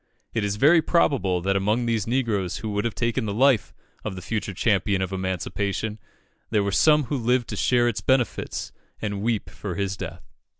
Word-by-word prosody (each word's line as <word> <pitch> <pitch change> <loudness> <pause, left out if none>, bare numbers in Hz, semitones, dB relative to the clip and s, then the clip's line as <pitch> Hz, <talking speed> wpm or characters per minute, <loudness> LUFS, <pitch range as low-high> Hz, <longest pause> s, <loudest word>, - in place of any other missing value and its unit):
It 115 - 0
is 100 0 -1
very 155 +9 +5
probable 125 - +2
that 100 +2 0
among 105 +5 +1
these 115 -3 0
negroes 115 -7 0
who 110 - -4
would 105 +1 -1
have 115 -5 -2
taken 115 +5 0
the 100 - -2
life 130 -3 +3 0.3
of 105 - -4
the 90 - -7
future 105 -1 -2
champion 100 -2 +1
of 95 0 -2
emancipation, 100 +3 -2 0.5
there 105 -2 +2
were 100 - -1
some 150 +8 +5
who 140 +2 -2
lived 125 0 +1
to - - -3
share 120 -1 +3
its 120 - -1
benefits 130 -3 0 0.3
and 100 -2 -3
weep 110 -1 0
for 95 -4 -6
his 100 -1 -1
death. 85 -2 -8
105 Hz, 190 wpm, -24 LUFS, 100-120 Hz, 0.5 s, very